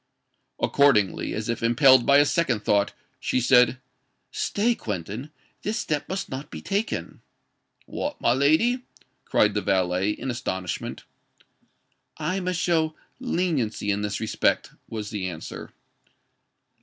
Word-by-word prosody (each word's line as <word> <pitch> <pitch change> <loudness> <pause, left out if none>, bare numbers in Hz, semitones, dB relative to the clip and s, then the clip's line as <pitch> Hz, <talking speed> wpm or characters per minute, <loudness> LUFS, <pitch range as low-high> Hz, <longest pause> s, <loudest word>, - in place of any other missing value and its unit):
Accordingly, 130 -9 +2
as 110 0 -3
if 115 - -2
impelled 120 +2 +5
by 140 - +7
a 145 - +6
second 140 -9 +1
thought, 100 0 +2 0.3
she - - 0
said, 125 0 +4 0.5
"Stay, 225 +4 +1
Quentin: 105 - -5 0.3
this 215 +3 -2
step 150 -8 -2
must 195 +1 -3
not 135 +2 -6
be - - -7
taken." 200 +3 -3 0.6
"What, 290 +1 -4
my 120 - +3
lady?" 160 - +3 0.4
cried 105 -1 +3
the 105 - 0
valet, 95 0 +1
in 125 +5 -3
astonishment. 95 -7 -4 1.1
"I 165 +5 -1
must 180 -2 -2
show 160 -3 +1 0.2
leniency 160 - -1
in 100 +1 -1
this 105 -1 -2
respect," 110 0 0 0.2
was 110 -2 -5
the 95 -4 -3
answer. 80 -2 -8
125 Hz, 130 wpm, -25 LUFS, 105-165 Hz, 1.1 s, by